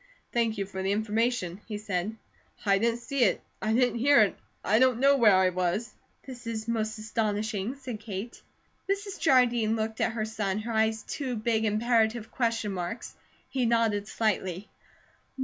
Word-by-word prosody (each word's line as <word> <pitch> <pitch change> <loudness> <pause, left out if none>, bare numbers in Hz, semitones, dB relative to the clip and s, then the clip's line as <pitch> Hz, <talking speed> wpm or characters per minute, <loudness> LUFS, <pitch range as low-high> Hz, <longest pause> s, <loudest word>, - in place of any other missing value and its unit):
"Thank 230 -2 +1
you 200 - -1
for 190 -1 -6
the 190 +1 0
information," 215 -3 0
he 210 -2 -4
said. 205 0 -3 0.5
"I 195 -1 +4
didn't 235 +2 0
see 260 +2 0
it, 200 - +3 0.2
I 215 - 0
didn't 240 0 +2
hear 280 0 +6
it, 205 - +2 0.3
I 215 +3 +4
don't 255 -2 +4
know 275 +2 +5
where 220 -7 +6
I 185 0 +4
was." 185 +5 -1 0.3
"This 250 -3 -9
is 220 -1 -4
most 220 -1 -1
astonishing," 215 +1 -2
said 255 -5 -7
Kate. 210 +1 -6 0.5
Mrs. 400 0 -2
Jardine 240 -6 +3
looked 220 0 -3
at - - +1
her 220 -1 -2
son, 210 -3 -2
her 230 +1 -4
eyes 220 0 +1
two 260 -4 -4
big 220 0 0
imperative 220 +1 +1
question 230 -4 0
marks. 180 +4 -5 0.3
He 255 -3 0
nodded 225 -3 +1
slightly. 200 -4 -1
220 Hz, 165 wpm, -28 LUFS, 210-235 Hz, 0.5 s, hear